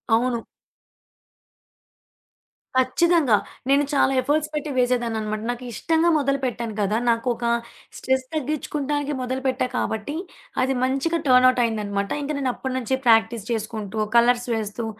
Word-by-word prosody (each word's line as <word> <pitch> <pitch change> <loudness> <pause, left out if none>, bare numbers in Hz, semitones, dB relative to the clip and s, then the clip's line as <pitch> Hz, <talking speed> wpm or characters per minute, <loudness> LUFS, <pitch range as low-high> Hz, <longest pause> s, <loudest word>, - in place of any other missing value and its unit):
అవును. 240 +1 +1 2.4
ఖచ్చితంగా. 260 0 +3 0.3
నేను 280 +1 +4
చాలా 275 -1 +3
ఎఫర్ట్స్ 305 +2 0
పెట్టి 300 0 -3
వేసేదాననమాట. 230 -4 0
నాకు 245 +1 -7
ఇష్టంగా 330 +1 +2
మొదలుపెట్టాను 260 -5 -1
కదా! 205 +2 +1
నాకొక 235 +1 0 0.5
స్ట్రెస్ 260 0 0
తగ్గించుకోవడానికి 295 0 -2
మొదలుపెట్టా 260 0 -1
కాబట్టి 220 +7 -2 0.5
అది 265 +1 +1
మంచిగా 275 +6 0
టర్న్‌అవుట్ 255 -1 +5
అయిందనమాట. 200 -3 -2
ఇంక 285 - -3
నేను 260 -2 0
అప్పటినుంచి 260 0 -2
ప్రాక్టీస్ 225 -2 +3
చేసుకుంటూ 220 -1 -3 0.2
కలర్స్ 245 +1 +3
వేస్తూ 220 +1 -4
255 Hz, 110 wpm, -23 LUFS, 225-275 Hz, 2.4 s, టర్న్‌అవుట్